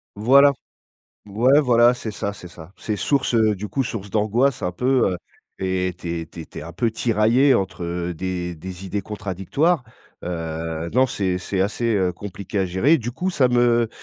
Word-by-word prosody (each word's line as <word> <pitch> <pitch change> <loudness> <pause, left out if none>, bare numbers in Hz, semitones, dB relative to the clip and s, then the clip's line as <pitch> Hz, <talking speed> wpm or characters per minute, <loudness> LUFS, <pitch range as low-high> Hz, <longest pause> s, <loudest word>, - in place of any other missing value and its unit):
Voilà. 140 +6 +6 0.7
Ouais, 120 +8 +3
voilà, 120 -2 +4
c'est 115 -3 -5
ça, 100 0 -4
c'est 90 - -11
ça. 85 0 -13
C'est 105 +2 -3
source, 135 +1 0
heu, 110 -2 +3
du 105 +2 -6
coup, 135 - -1
source 105 -5 -5
d'angoisse 115 +5 +1
un 90 - -1
peu, 125 0 +2
heu 90 - -4 0.4
et 95 -1 -1
tu 85 -1 -4
es 80 - -7
tu 85 - -11
es - - -7
tu - - -11
es - - -6
un 85 - -8
peu 115 +6 0
tiraillé 115 +4 +3
entre, 95 -2 -2
heu, 85 +1 -3
des 90 0 -4
des 90 +3 -9
idées 100 +2 -3
contradictoires. 105 - -1 0.4
Heu, 80 -1 -4
non 130 +1 +4
c'est 95 -6 -1
c'est 95 +1 -1
assez, 115 +3 0
heu, 95 -3 +1
compliqué 100 +1 -6
à 95 - +1
gérer. 115 - +3
Du 120 0 -4
coup, 180 +9 -2
ça 130 -7 +2
me 120 -1 +3
105 Hz, 195 wpm, -22 LUFS, 90-120 Hz, 0.7 s, Voilà